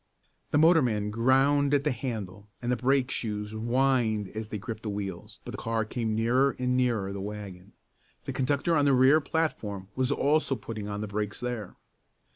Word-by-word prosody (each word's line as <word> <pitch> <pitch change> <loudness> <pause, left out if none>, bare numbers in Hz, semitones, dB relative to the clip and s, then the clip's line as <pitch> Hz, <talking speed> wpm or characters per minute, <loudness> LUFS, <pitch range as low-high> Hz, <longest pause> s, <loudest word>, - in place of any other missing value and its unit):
The - - +2
motorman 125 -11 +4
ground 135 +5 +3
at 140 - +1
the 150 - +1
handle, 105 -5 -5
and 120 0 -2
the - - +3
brake 130 +2 +1
shoes 105 -2 -3
whined 115 -2 +1
as 110 +1 -6
they 110 - -3
gripped 110 +1 -6
the 110 - -4
wheels, 100 -3 -6
but - - -6
the - - -7
car 115 -1 -1
came 110 0 -2
nearer 125 +5 +2
and 125 0 0
nearer 115 -6 +1
the 100 - -5
wagon. 100 -2 -8 0.5
The - - -5
conductor 140 +5 +1
on 145 -2 +3
the 140 - +4
rear 130 +5 +5
platform 105 - -2
was 130 +1 +1
also 145 0 +2
putting 110 -2 -6
on 105 0 -4
the 110 - -3
brakes 105 0 -3
there. 120 -5 -4
115 Hz, 185 wpm, -28 LUFS, 105-135 Hz, 0.5 s, rear